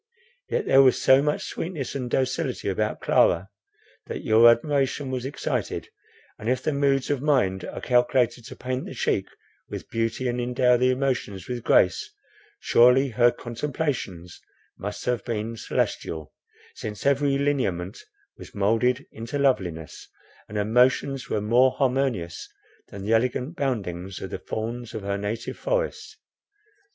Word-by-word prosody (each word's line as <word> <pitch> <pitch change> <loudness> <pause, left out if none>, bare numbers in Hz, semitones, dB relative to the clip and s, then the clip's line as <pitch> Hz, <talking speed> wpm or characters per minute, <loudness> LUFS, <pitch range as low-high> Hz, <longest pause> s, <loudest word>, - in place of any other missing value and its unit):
Yet 475 -3 -1
there 135 - +6
was 130 -2 +4
so 130 +1 +6
much 150 +1 -1
sweetness 160 -7 -4
and 125 -3 -4
docility 130 +1 -1
about - - -1
Clara, 90 +3 +3 0.6
that - - -5
your 115 +2 +7
admiration 135 +2 +1
was 130 -1 -3
excited; 135 - -3 0.5
and 110 - -3
if 130 0 0
the 155 - 0
moods 140 -1 +1
of 140 -3 0
mind 125 -11 +1
are - - -6
calculated 120 -1 +2
to - - -9
paint 130 0 -3
the - - -8
cheek - - 0 0.4
with - - -7
beauty, 115 +3 -1
and 120 0 -1
endow 125 0 +3 0.2
motions 125 -8 -2
with 125 -2 -4
grace, 425 - +3 0.5
surely 125 - +5
her 120 0 +4
contemplations 120 - -4 0.3
must 105 +1 -6
have 125 -1 0
been 115 -1 -3
celestial; 80 -7 -3 0.4
since 105 -1 -7
every 140 0 +3
lineament 105 -10 -1 0.4
was - - -12
moulded 115 +6 +1
into 115 +5 -5
loveliness, 90 - -1 0.4
and 105 - -5
her 105 - +1
motions 125 +4 +2
were 105 - 0
more 125 +5 +4
harmonious 130 - -1 0.4
than 100 -1 -9
the 110 +3 +1
elegant 125 +6 0
boundings 95 - -3
of - - -7
the - - -4
fawns 115 +2 -5
of 110 - -5
her 100 0 -2
native 110 +3 -4
forest. - - -2
125 Hz, 145 wpm, -25 LUFS, 110-135 Hz, 0.6 s, your